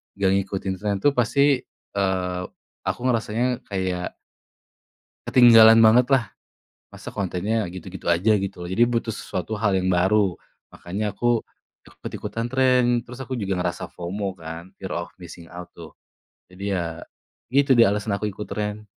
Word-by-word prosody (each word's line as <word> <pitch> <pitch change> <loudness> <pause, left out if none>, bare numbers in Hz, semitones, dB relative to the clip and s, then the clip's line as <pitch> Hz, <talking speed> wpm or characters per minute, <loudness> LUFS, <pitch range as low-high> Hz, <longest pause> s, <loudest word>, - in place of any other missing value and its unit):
nggak 100 -1 +1
ngikutin 95 0 -4
tren 105 -1 -1
tuh 145 -1 +3
pasti, 140 +3 +3 0.3
eee, 90 -2 -1 0.4
aku - - -2
ngerasanya 120 +1 0
kayak 95 -2 -2 1.2
ketinggalan 115 -3 +8
bangetlah. 120 +1 +4 0.6
Masa - - -10
kontennya 100 +3 -1
gitu-gitu 95 +1 -9
aja 90 +6 +3
gitu, 95 -2 -5
jadi 95 +7 +2
butuh 115 -1 -1
sesuatu 90 -1 -5
hal 105 -2 +1
yang 95 0 0
baru, 95 +1 +2 0.4
makanya 100 +4 -4
aku 120 +2 +1 0.4
ikut-ikutan 115 +1 -6
tren, 125 -2 +3
terus 125 +1 -11
aku 130 0 -4
juga 95 -5 -2
ngerasa 90 0 -3
FOMO 95 +3 -4
kan, 80 +2 -8
fear 95 - -5
of - - -17
missing 85 -1 -10
out 90 0 -9
tuh. 85 -2 -11 0.6
Jadi 95 +2 -5
ya 85 -3 -3 0.5
itu 140 0 +4
dia 115 -3 +6
alasan 105 0 -2
aku 105 +1 -2
ikut 105 +2 -7
tren. 105 +1 -4
100 Hz, 140 wpm, -23 LUFS, 90-115 Hz, 1.2 s, ketinggalan